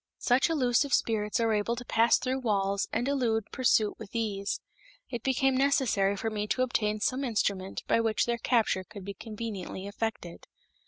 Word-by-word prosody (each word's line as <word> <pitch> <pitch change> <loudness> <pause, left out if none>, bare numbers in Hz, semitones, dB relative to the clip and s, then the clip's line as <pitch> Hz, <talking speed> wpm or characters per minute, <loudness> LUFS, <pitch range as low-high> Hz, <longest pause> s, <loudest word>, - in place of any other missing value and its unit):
Such 255 +6 +2
elusive 275 -2 +2
spirits 210 -1 0
are 225 -1 +2
able 210 +3 0
to 245 +1 -7
pass 230 0 +4
through 260 +1 -2
walls 200 -4 0
and 245 - -1
elude 235 -6 +1
pursuit 230 -5 +2
with 220 0 -10
ease. 205 -3 -2 0.5
It 240 -3 -3
became 265 +1 +2
necessary 255 -8 +2
for 225 +2 -2
me 210 -1 -2
to 255 - +1
obtain 215 -4 0
some 255 +6 0
instrument 200 -5 -1
by - - +3
which 225 -1 +1
their 235 0 -1
capture 225 -7 +1
could 200 0 -11
be 200 - -5
conveniently 210 -3 -6
effected. 205 -4 -5
225 Hz, 170 wpm, -29 LUFS, 205-245 Hz, 0.5 s, pass